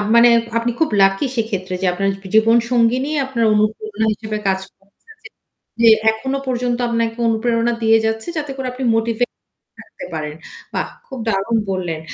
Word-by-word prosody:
মানে 235 +1 +7 0.3
আপনি 235 +1 0
খুব 320 - +2
লাকি 195 +6 +3
সেক্ষেত্রে 195 -5 -2
যে - - 0
আপনার 195 +2 0 0.3
জীবনসঙ্গিনী 235 +3 +3 0.2
আপনার 240 -4 0
অনুপ্রেরণা 215 0 0
হিসেবে 215 0 -5
কাজ 190 0 +2 0.2
করছে 195 +1 -35 0.2
জি, - - -9 0.5
জি 230 - +5 0.2
এখনো 265 +5 -3
পর্যন্ত 245 -1 -1
আপনাকে 230 0 -1
অনুপ্রেরণা 230 +1 +1
দিয়ে 225 0 +5
যাচ্ছে 220 +3 -2
যাতে 295 -2 -3
করে 265 -1 -3
আপনি 260 +1 -6
মোটিভেট 230 +2 0 0.5
থাকতে - - -11
পারেন। 150 -1 -4 0.4
বাহ! - - -1 0.2
খুব 265 -3 -8
দারুন 200 +3 0
বললেন। 175 -4 -3
225 Hz, 155 wpm, -19 LUFS, 205-240 Hz, 0.5 s, মানে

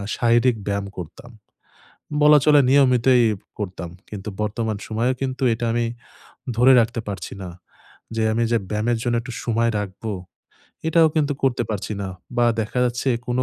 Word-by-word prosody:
শারীরিক 120 0 +3
ব্যায়াম 100 0 -1
করতাম, 120 - -9 0.9
বলা 150 0 +7
চলে 150 -1 +6
নিয়মিতই 130 -2 +4 0.3
করতাম। 90 -3 -5 0.2
কিন্তু 105 0 -6
বর্তমান 110 0 -2
সময়েও 120 +4 0
কিন্তু 130 0 -2
এটা 120 +1 -3
আমি 120 0 +1 0.7
ধরে 125 +2 +6
রাখতে 115 +1 -1
পারছি 100 - -6
না। 90 - -6 0.7
যে, 110 - +1
আমি 115 +2 0
যে 115 - +4
ব্যায়ামের 110 +2 0
জন্য 120 -1 0
একটু 125 - -8
সময় 115 0 +1
রাখবো, 105 +2 -5 0.8
এটাও 160 0 +5
কিন্তু 145 -2 +2
করতে 125 -2 +1
পারছি 105 +1 -3
না 95 - -4 0.3
বা 120 - +3 0.2
দেখা 110 +3 -3
যাচ্ছে 120 +2 -2 0.2
কোনো 125 +1 0
120 Hz, 150 wpm, -22 LUFS, 110-130 Hz, 0.9 s, বলা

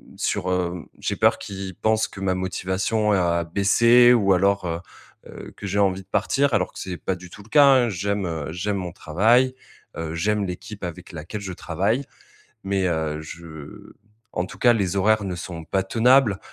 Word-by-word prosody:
sur, 90 - -2
heu 90 -1 -2
j'ai - - -2
peur - - +3
qu'il 95 -2 -7
pense 110 +3 +1
que 95 - -11
ma 95 -1 +1
motivation 95 +4 -1
a 85 -3 +2
baissé, 115 +7 +5
ou, 100 -5 +3
alors, 100 +1 +2
heu, 85 -1 -2 0.5
heu, - - -10
que 105 - -6
j'ai 100 +1 -2
envie 95 -1 +2
de - - -37
partir, 135 +6 +1
alors 95 -3 +1
que - - -10
c'est 90 -1 -5
pas 95 +4 -2
du 90 0 -12
tout 105 - -13
le 110 - -20
cas, 145 +2 +6
hein. 130 -3 +5
J'aime 100 0 -2
heu, 80 -4 -4
j'aime 100 +3 -2
mon 90 -2 -5
travail, 115 +10 +2 0.4
heu, 80 0 -4
j'aime 105 +4 0
l'équipe 100 +2 -7
avec 85 -2 -8
laquelle 85 +6 -7
je 95 -2 -5
travaille. 100 - -1 0.6
Mais, 95 -1 0
heu, 80 -3 -2
je 80 -2 -11 0.4
en 90 - -2
tout - - -11
cas, 120 - +5
les 100 -4 -1
horaires 105 +2 +2
ne 90 -2 -3
sont 85 -2 -7
pas 95 +3 0
tenables 115 0 +3
95 Hz, 190 wpm, -23 LUFS, 90-105 Hz, 0.6 s, cas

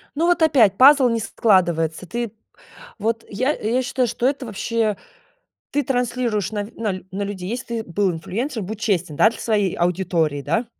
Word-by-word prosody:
Ну 330 +3 +1
вот 350 -2 +2
опять: 235 -11 +4
пазл 270 0 +7
не 230 -1 0
складывается, 175 -6 +1
ты 235 +1 -4 0.7
Вот 225 +2 -1
я 255 +8 0
я 235 +4 -1
считаю, 255 -1 0
что 240 +2 0
это 270 -1 -2
вообще 220 0 -1 0.7
ты 290 - +1
транслируешь 245 -5 -1
на 205 -1 -2
на 205 -5 -3
на 195 +2 -4
людей, 195 -2 -5
если 235 -1 -4
ты 215 - -14
был 190 +2 +1
инфлюенсер, 220 - -4
будь 210 +3 -6
честен, 180 -8 -1
да, 220 - +5
для 230 - -10
своей 205 -5 0
аудитории, 170 -4 0
да? 165 - -1
220 Hz, 170 wpm, -21 LUFS, 185-245 Hz, 0.7 s, пазл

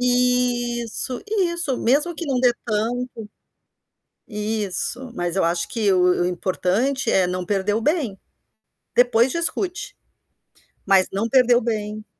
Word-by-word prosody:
Isso, 245 -2 0
isso. 340 - 0
Mesmo 295 +8 +1
que 335 - -5
não 260 -3 0
dê 250 -1 +4
tanto, 235 +3 -1 1.2
isso, 215 +3 -2
mas 175 -2 -3
eu 190 - +2
acho 170 +1 0
que 210 -4 0
o 180 -1 +3
o - - +2
importante 190 +9 0
é 185 -2 +3
não 180 0 -3
perder 200 +1 0
o 225 - 0
bem. 280 - 0 0.8
Depois 245 0 +4
discute, 345 +1 -3 0.9
mas 195 -1 +4
não 200 +4 -1
perder 250 -1 +4
o 240 - +3
bem. 215 -1 -3
235 Hz, 135 wpm, -22 LUFS, 195-255 Hz, 1.2 s, dê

